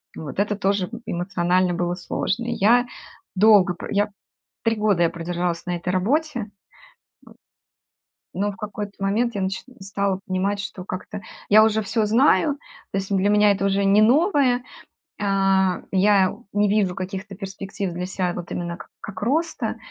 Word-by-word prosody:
Вот. 155 +3 -6
Это 210 +1 +1
тоже 195 -2 0 0.2
эмоционально 180 0 0
было 175 0 -1
сложно. 200 +5 -2
И 240 - -2
я 240 +5 +4 0.5
долго 200 -3 +6
про - - -8
я 205 +1 +1 0.5
3 225 0 +2
года 210 -5 +2
я 165 - +3
продержалась 170 +1 -3
на 175 -1 -2
этой 170 +1 -5
работе. 275 - 0
Вот. 205 - -7 1.9
Но 205 +2 -1
в - - -13
какой-то 210 0 -5
момент 225 +4 +1
я 200 - -2
нач 190 0 -2 0.2
стала 195 0 -2
понимать, 195 +1 -1
что 190 -2 -7
как-то 190 +2 -6 0.3
я 215 +1 +7
уже 220 0 +2
всё 220 +2 0
знаю, 275 +6 +3 0.3
то 195 - 0
есть 195 +1 -5
для 195 +2 +2
меня 210 0 +5
это 195 0 -2
уже 195 0 +2
не 205 +2 +5
новое, 265 - +3 0.6
а, 195 -2 +2
я 195 -1 +3 0.2
не 205 0 +2
вижу 200 -3 +1
каких-то 195 +2 -6
перспектив 195 -1 -5
для 180 +1 -3
ся, 185 -1 -2
вот 175 - -6
именно 170 -1 -4
как - - -13
как 200 -1 -8
роста, 320 +8 -1
195 Hz, 165 wpm, -23 LUFS, 185-210 Hz, 1.9 s, я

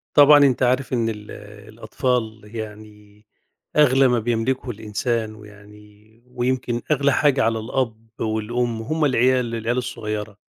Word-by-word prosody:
طبعًا 145 0 +8
أنت 130 -1 +2
عارف 130 +1 +1
إن 115 -2 +1
ال 105 -1 -7 0.4
الأطفال 110 0 -2
يعني 105 -1 -10 0.5
أغلى 135 -2 +5
ما 125 -1 +2
بيملكه 120 +3 -1
الإنسان، 110 0 -3
ويعني 105 +1 -17
ويمكن 125 -1 -2
أغلى 140 -1 +3
حاجة 140 -2 +3
على 115 0 +1
الأب 115 -1 -3
والأم 115 +1 -2
هُم 155 +6 -1
العيال 125 -2 +2
العيال 115 +2 -2
الصغيّرة. 105 -4 -4
115 Hz, 125 wpm, -22 LUFS, 110-125 Hz, 0.5 s, طبعًا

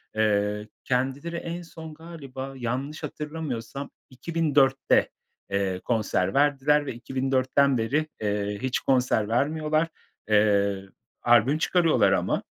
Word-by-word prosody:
Eee, 105 -1 +1 0.2
kendileri 135 +6 -1
en 170 +1 -5
son 160 -2 -10
galiba 140 -5 -8
yanlış 130 +6 -4
hatırlamıyorsam 140 -4 -5 0.2
2004'te, 140 -1 +2 0.4
eee, 95 -2 0
konser 105 -5 0
verdiler 145 +1 +3
ve 135 - -4
2004'ten 130 +2 +1
beri, 145 +8 0
eee, 105 -1 -1
hiç 130 -1 0
konser 125 -5 +1
vermiyorlar. 155 +6 +1 0.4
Eee, 100 -2 +3 0.4
albüm 120 +5 +4
çıkarıyorlar 170 -1 +3
ama - - 0
135 Hz, 105 wpm, -26 LUFS, 110-150 Hz, 0.4 s, albüm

